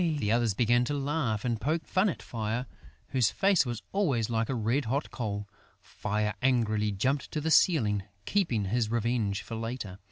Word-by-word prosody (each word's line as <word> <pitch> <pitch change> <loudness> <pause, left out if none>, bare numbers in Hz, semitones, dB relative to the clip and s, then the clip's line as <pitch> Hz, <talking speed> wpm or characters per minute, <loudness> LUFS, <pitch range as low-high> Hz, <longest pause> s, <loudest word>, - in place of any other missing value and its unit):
The 105 -6 0
others 115 -3 +2
began 120 +2 +3
to 145 - -2
laugh 135 -7 -1
and 115 -3 -1
poke 155 +6 0
fun 190 +3 +2
at 170 - -5
Fire, 115 +2 -3 0.4
whose 125 -5 +3
face 195 -8 +3
was 120 -1 -4
always 135 - +1
like 115 -1 0
a 135 - 0
red 115 +5 0
hot 135 +7 -1
coal. 105 -4 -3 0.3
Fire 105 0 -2
angrily 110 -5 +2
jumped 130 +8 0
to 155 - -2
the 160 +2 -1
ceiling, 110 - +4 0.2
keeping 130 - +1
his 110 +2 0
revenge 115 -3 0
for - - -8
later. 115 -4 -5
120 Hz, 180 wpm, -29 LUFS, 110-140 Hz, 0.4 s, ceiling